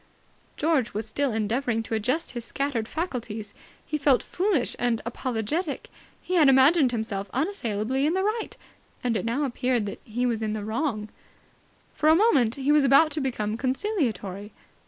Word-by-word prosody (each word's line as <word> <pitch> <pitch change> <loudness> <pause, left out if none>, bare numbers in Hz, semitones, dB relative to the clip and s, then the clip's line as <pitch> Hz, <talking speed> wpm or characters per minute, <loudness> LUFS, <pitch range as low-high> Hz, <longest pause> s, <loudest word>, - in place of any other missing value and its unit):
George 295 -9 +1
was 215 +1 -2
still 280 +4 0
endeavouring 225 +2 0
to 225 - -6
adjust 255 +10 0
his 240 -2 -5
scattered 245 -2 -2
faculties. 230 - -4 0.3
He 300 - -2
felt 275 -3 +3
foolish 360 - 0
and 240 -2 +1
apologetic. 255 - -3 0.3
He 365 - -5
had 315 -6 +6
imagined 270 +1 +5
himself 215 -4 -3
unassailably 265 - -1
in 325 - +1
the 380 - +1
right, 435 +2 -2 0.5
and 240 -2 0
it 205 - -1
now 240 +6 0
appeared 250 -3 0
that 200 - -6
he 245 +2 -2
was 230 -3 0
in 215 -1 -1
the 210 -1 -4
wrong. 220 -2 -2 0.8
For 305 - +2
a 315 - +7
moment 285 - +3
he 275 +1 0
was 300 -1 +5
about 275 +4 +5
to 295 +1 -2
become 220 -5 -2
conciliatory. 240 - -2
250 Hz, 165 wpm, -26 LUFS, 220-300 Hz, 0.8 s, a